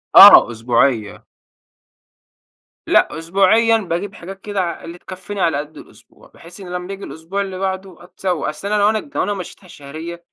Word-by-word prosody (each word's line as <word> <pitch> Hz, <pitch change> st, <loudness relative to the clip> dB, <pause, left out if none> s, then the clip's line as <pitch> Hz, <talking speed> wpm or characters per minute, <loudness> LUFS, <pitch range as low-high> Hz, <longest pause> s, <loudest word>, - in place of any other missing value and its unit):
آه، -, -, +10 dB
أسبوعية. 115 Hz, -1 st, 0 dB, 1.6 s
لأ 150 Hz, -, +2 dB
أسبوعيًا 200 Hz, +7 st, +3 dB
باجيب 195 Hz, -1 st, -4 dB
حاجات 195 Hz, +2 st, -10 dB
كده 205 Hz, -2 st, -3 dB
ع 170 Hz, -1 st, -4 dB
اللي 170 Hz, +1 st, -9 dB
تكفيني 190 Hz, +2 st, -8 dB
على 165 Hz, -5 st, +1 dB
قدّ 150 Hz, +1 st, -7 dB
الأسبوع -, -, -18 dB
بحيث 175 Hz, +4 st, -15 dB
إنه 185 Hz, -2 st, -10 dB
لمّا 180 Hz, 0 st, -5 dB
بييجي 195 Hz, 0 st, -8 dB
الأسبوع 165 Hz, +5 st, -5 dB
اللي 190 Hz, -2 st, -5 dB
بعده 190 Hz, -2 st, -5 dB
أتسوّق، 180 Hz, -2 st, -3 dB
أصل 155 Hz, +6 st, -5 dB
أنا 210 Hz, -, 0 dB
لوأنا 215 Hz, +6 st, +1 dB
لوأنا 205 Hz, -, 0 dB
مشّيتها 185 Hz, 0 st, -9 dB
شهريًا 160 Hz, +3 st, -9 dB
185 Hz, 155 wpm, -18 LUFS, 165-195 Hz, 1.6 s, آه